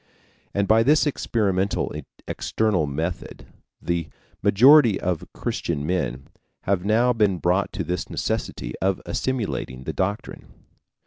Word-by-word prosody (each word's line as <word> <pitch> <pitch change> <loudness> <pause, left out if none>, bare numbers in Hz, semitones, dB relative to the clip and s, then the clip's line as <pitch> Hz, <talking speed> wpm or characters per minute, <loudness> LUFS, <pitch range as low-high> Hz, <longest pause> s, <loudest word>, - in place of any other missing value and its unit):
And 100 0 +1
by 110 +1 +5
this 150 +7 +4
experimental 100 -8 0 0.3
external 100 -9 0
method 80 +5 -4 0.3
the 85 -2 -2 0.3
majority 125 0 +6
of 90 -3 -2
Christian 70 - -3
men 75 -7 -2 0.3
have 95 -2 0
now 115 +5 +3
been 105 -5 +2
brought 90 +3 +1
to - - -2
this 90 +1 -3
necessity - - -3
of 95 0 +1
assimilating 105 - -3
the - - -4
doctrine. 100 +3 -3
95 Hz, 120 wpm, -24 LUFS, 85-110 Hz, 0.3 s, majority